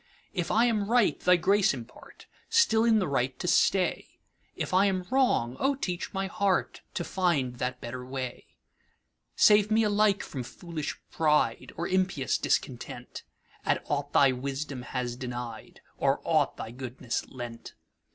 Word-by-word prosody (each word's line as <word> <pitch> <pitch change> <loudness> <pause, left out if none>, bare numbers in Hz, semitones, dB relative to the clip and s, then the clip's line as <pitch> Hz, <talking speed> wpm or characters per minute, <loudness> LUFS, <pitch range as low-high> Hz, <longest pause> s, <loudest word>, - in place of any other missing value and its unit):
If 175 -3 -2
I 230 +2 +4
am 215 -4 0
right, 240 -2 +3
thy 180 0 +5
grace 195 -1 +3
impart, 120 -2 -12 0.2
Still 450 - +4
in 225 -2 +5
the 195 - +1
right 130 -2 -1
to 180 - -4
stay; 185 0 +2 0.4
If - - -4
I 190 +2 +5
am 185 -2 -1
wrong, 190 - +2
O 275 +1 +2
teach 180 -9 -4
my 195 0 -2
heartTo 195 -4 -1
find 150 -11 0
that 125 +1 -3
better 125 +1 -6
way. 130 -1 -6 0.9
Save 210 -1 +5
me 220 +1 +3
alike 210 -1 +2
from 135 - -6
foolish 155 +4 -6
PrideOr 150 +1 +1
impious 185 - +1
Discontent, - - -3 0.4
At - - 0
aught 145 0 -2
thy 140 -2 +5
wisdom 135 +1 -4
has 125 -1 -3
denied, 120 -3 -7 0.2
Or - - +2
aught - - +1
thy 110 - -6
goodness 125 -1 -4
lent. 120 -2 -8
160 Hz, 145 wpm, -28 LUFS, 125-200 Hz, 0.9 s, thy